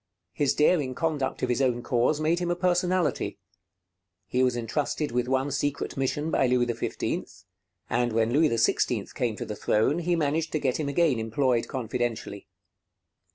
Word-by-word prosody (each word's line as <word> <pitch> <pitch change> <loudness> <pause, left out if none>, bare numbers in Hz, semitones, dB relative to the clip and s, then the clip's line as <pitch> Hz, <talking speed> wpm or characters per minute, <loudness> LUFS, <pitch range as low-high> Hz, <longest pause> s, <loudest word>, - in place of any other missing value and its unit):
His 145 -2 +1
daring 150 -4 +2
conduct 155 -5 -2
of 125 - +1
his 125 +2 +1
own 120 -2 +1
cause 125 +5 +1
made 160 +3 +1
him 175 -1 -2
a 175 - +1
personality. 180 -3 0 0.9
He 125 +7 0
was 125 -1 +2
intrusted 140 +5 -2
with 125 0 0
one 130 +2 0
secret 145 0 -2
mission 145 +4 -1
by 130 - +3
Louis 125 0 +2
XV; 120 -1 -2 0.6
and 120 0 0
when 115 +1 +1
Louis 155 +2 +4
XVI 115 -1 +1
came 120 -4 -1
to - - -5
the 105 - -5
throne, 110 +11 +1
he 175 0 +1
managed 160 0 0
to 155 - +1
get 130 -1 0
him 145 -2 -1
again 140 -4 +2
employed 115 +2 0
confidentially. 120 -5 -3
130 Hz, 165 wpm, -27 LUFS, 120-155 Hz, 0.9 s, Louis